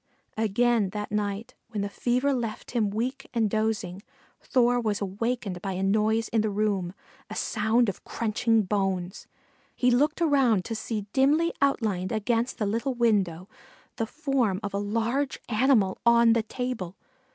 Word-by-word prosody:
Again 220 0 +2
that 210 -1 -4
night, 210 +3 -2 0.2
when 215 -3 -3
the - - -1
fever 250 +6 0
left 235 -4 -4
him 225 -4 +1
weak 250 +7 -3
and 225 -2 +3
dozing, 210 -3 -1 0.4
Thor 245 -1 +2
was 215 -3 -1
awakened 200 -1 -3
by 195 0 -3
a 185 +1 -2
noise 215 +3 +2
in 225 - +2
the 215 - 0
room, 200 -3 -1 0.3
a - - -6
sound 220 +3 +1
of 195 - -4
crunching 225 0 +1
bones. 190 -2 -2 0.5
He 250 0 +3
looked 295 +6 +2
around 270 - +3
to - - -4
see 220 -1 -4
dimly 300 +6 +3
outlined 215 -10 +1
against 230 +2 0
the 215 - -1
little 230 +6 -1
window, 195 -7 +1 0.5
the 225 - -1
form 265 -9 0
of 200 - -4
a 200 - 0
large 230 +7 -1
animal 220 -4 +2
on 235 -1 +6
the 230 - +2
table. 220 -5 -4
220 Hz, 155 wpm, -27 LUFS, 200-245 Hz, 0.5 s, on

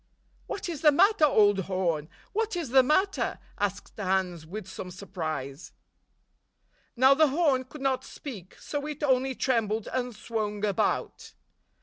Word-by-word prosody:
"What 395 - -4
is 330 -5 -5
the 300 - +7
matter, 375 +2 +5
old 205 -8 +4
horn? 170 -5 -1 0.2
What 440 -1 -1
is 335 -7 -3
the 265 +2 +7
matter?" 375 +9 +1 0.2
asked 205 0 -3
Hans, 185 -4 -1
with 200 +2 -7
some 185 -1 -7
surprise. 155 -7 -6 1.2
Now 260 +2 +6
the 310 +2 +5
horn 280 -3 +2
could 285 +2 -11
not 265 -1 0
speak, 205 - -9
so 290 0 -5
it 300 -1 -6
only 265 -1 +2
trembled 225 -5 0
and 250 -2 -2
swung 210 -1 -3
about. 200 -3 -1
245 Hz, 140 wpm, -28 LUFS, 190-290 Hz, 1.2 s, the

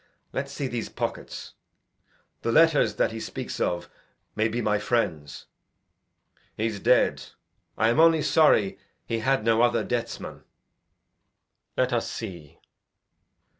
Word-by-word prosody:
Let's 140 +1 -3
see 140 -1 -3
his 120 -2 -4
pockets; - - -5 0.9
these 115 - -1
letters 160 +3 +4
that - - +1
he 115 - -6
speaks - - -6
of 85 0 -1 0.5
May 110 +1 +2
be 115 +2 -3
my 105 -3 +1
friends. 80 - -2 1.1
He's 110 -1 -2
dead. - - +3 0.5
I 110 - +3
am 120 - +2
only 165 -2 +5
sorry 145 -9 +3 0.3
He 115 - -2
had 130 0 +1
no 115 0 +3
other 120 -1 +3
deathsman. 120 -1 -4 1.3
Let 125 -1 +1
us 120 - 0
see. 85 -10 -8
115 Hz, 125 wpm, -26 LUFS, 110-130 Hz, 1.3 s, only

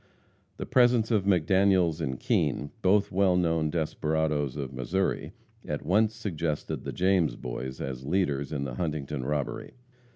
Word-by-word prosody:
The - - -4
presence 120 -2 +3
of 105 -4 +2
McDaniels 95 -2 +3
and 65 -4 -3
Kean, 70 0 0
both 100 +2 +3
well 95 -1 +3
known 80 -3 +1
desperadoes 75 -3 -1
of 70 -2 -5
Missouri, 85 +10 -1 0.3
at - - -4
once 105 +6 +2
suggested 85 -8 -3
the - - -3
James 90 -7 +2
Boys 65 +2 -6
as 65 -1 -5
leaders 70 -3 0
in 70 -3 -2
the 65 -3 -4
Huntington 75 -3 -3
robbery. 70 0 -3
80 Hz, 140 wpm, -28 LUFS, 70-95 Hz, 0.3 s, presence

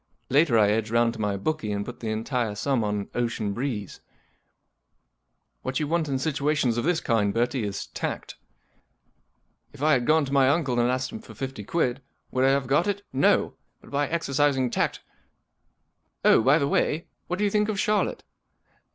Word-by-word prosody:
Later 140 -3 +4
I 105 -1 +4
edge 110 0 0
round 115 0 +2
to 115 - -7
my 105 -1 0
bookie 115 -1 -2
and 100 0 -2
put 125 - -8
the 115 - -4
entire 110 0 -2
sum 130 +1 0
on 105 -1 -2
Ocean 115 -4 -1
Breeze, 115 -5 -4 1.6
What 130 0 -2
you 150 - -1
want 165 -1 0
in 135 - 0
situations 145 -3 0
of 120 - -1
this 175 -1 +2
kind, 105 -4 +1
Bertie, 120 +2 0
is 100 -1 -4
tact* - - -5 1.4
If 145 0 -8
I 155 0 +5
had 125 -3 +1
gone 155 -1 +4
to 135 - -5
my 135 -2 +5
uncle 140 -5 +1
and 120 +1 +3
asked 130 0 -1
him 225 - -6
for 225 - -13
fifty 130 -5 -5
quid, 130 +1 -1 0.3
would 130 - +1
1 135 - +5
have 140 -1 +1
got 145 +8 +2
it? 200 0 -2
No 135 +2 +3
I - - -26 0.3
But - - -16
by 145 0 0
exercising 140 -5 +1
tact - - -1 0.6
—— - - -22
Oh! - - +6
by 135 +6 +5
the 140 - +1
way, 155 +3 0 0.2
what 180 - -2
do 210 - +1
you 200 - +1
think 210 +1 +1
of 205 -2 -2
Charlotte 210 +1 0
130 Hz, 195 wpm, -26 LUFS, 115-150 Hz, 1.6 s, Oh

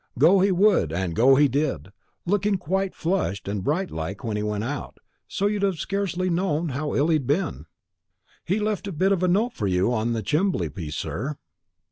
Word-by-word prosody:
Go 165 +9 +6
he 195 +1 +3
would, 185 - +3
and 85 0 -2
go 130 +4 +6
he 145 +2 +5
did; 130 - -2 0.3
looking 205 +2 +1
quite 190 +2 -2
flushed 165 - -1
and 100 -1 -3
bright 175 - -1
like 80 +5 -5
when 110 -3 -2
he 105 - -1
went 105 0 -2
out, 140 +3 -5 0.3
so 200 - -2
as 205 - +3
you'd 205 - -2
have 195 -3 +1
scarcely 185 0 -2
known 170 -2 0
how 145 +3 -3
ill 150 +4 +2
he'd 155 -6 +1
been. 145 +3 +4 0.2
And 70 +4 -13 0.8
he 190 +4 0
left 210 -1 -2
a - - -3
bit 185 +4 +1
of 190 -3 +1
a 185 - +2
note 215 +7 +2
for 105 - -2
you 95 +5 +1
on 115 +1 0
the 110 -2 -2
chimbley 150 - 0
piece, 80 -5 -6
sir." 140 +8 -3
150 Hz, 210 wpm, -24 LUFS, -, 0.8 s, Go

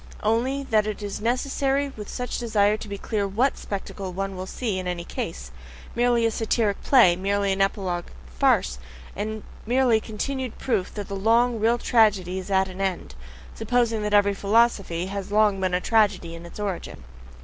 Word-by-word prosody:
Only, 245 +6 +1
that 215 -1 +3
it 210 0 -4
is 205 0 -5
necessary 270 +4 0
with 210 -2 -8
such 250 -1 -4
a - - -4
desire 215 -3 +2
to 215 - -8
be 200 0 -5
clear 205 0 -2
WHAT 235 +8 +1
spectacle 195 -1 -6
one 195 +1 -4
will 185 +1 -6
see 210 -3 -2
in 185 - -5
any 175 -1 -3
case 65 - -6 0.4
merely 240 -1 +3
a 225 - +2
satyric 220 -2 0
play, 235 -11 +5
merely 200 +2 0
an 195 0 0
epilogue 190 -3 -1 0.2
farce, 65 0 +1 0.4
merely 220 +3 0
the - - -16
continued 255 +3 -4
proof 215 -8 -1
that 205 -2 -5
the 200 - -5
long, 230 +4 +2
real 230 +3 +3
tragedy 205 -7 +2
IS 185 - -8
AT 190 -1 +2
AN 185 +1 -7
END, 185 - -2 0.4
supposing 230 - 0
that 210 0 -2
every 205 0 +4
philosophy 200 -4 +1
has 195 0 -5
been 205 - -4
a - - +6
long 190 -4 +2
tragedy 205 -7 +2
in 170 +1 -9
its 170 - -12
origin. 195 - -4
205 Hz, 180 wpm, -24 LUFS, 190-230 Hz, 0.4 s, a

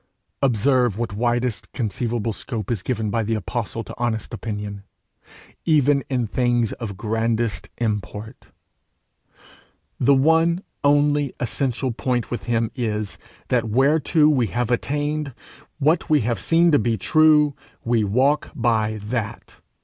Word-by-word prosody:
Observe 125 -3 +2
what 115 -2 -3
widest 120 +1 -1
conceivable 115 -1 -2
scope 110 -1 -5
is 110 -6 -1
given 110 -2 -2
by 115 - +1
the 110 +1 -1
apostle 115 +1 -3
to - - -9
honest 120 -1 -2
opinion, 105 -3 -5 0.8
even 145 -3 +3
in 125 -3 0
things 120 0 +1
of 100 -5 -5
grandest 110 -3 -1
import! 105 +1 -4 1.5
the 140 +2 +5
one 165 +6 +3 0.2
only 145 -1 +2
essential 125 +1 -1
point 125 0 -2
with 120 - -4
him 115 -1 0
is, 110 -5 -3 0.3
that 120 -3 +1
whereto 150 +6 +3
we 130 -7 +3
have 120 +5 -2
attained, 145 +2 -1 0.4
what 155 +3 +1
we 150 -2 +4
have 115 -2 -1
seen 165 - +3
to 145 - +5
be 115 0 0
true, 150 -1 +4 0.3
we 115 -2 +2
walk 130 +9 +2
by 110 -3 +1
that. 110 0 -4
120 Hz, 130 wpm, -22 LUFS, 110-140 Hz, 1.5 s, the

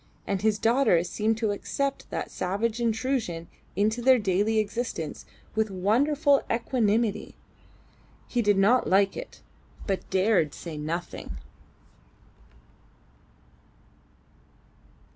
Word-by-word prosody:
And 195 -2 -1
his 215 -1 +2
daughter 225 -6 +3
seemed 215 +4 -1
to 220 -2 0
accept 275 +7 -3
that - - -4
savage 215 +5 -1
intrusion 225 -7 -1 0.3
into 215 +5 +1
their 260 +1 +6
daily 205 +1 +1
existence 215 -7 -3 0.3
with 220 0 0
wonderful 275 +10 +2
equanimity. 230 -2 0 0.9
He 245 - 0
did 205 -3 +3
not 225 +6 +4
like 195 +1 +3
it, - - -9 0.4
but 195 -2 -3
dared 190 -5 +2
say 165 -3 -7
nothing. 155 - -5
215 Hz, 100 wpm, -27 LUFS, 190-235 Hz, 0.9 s, their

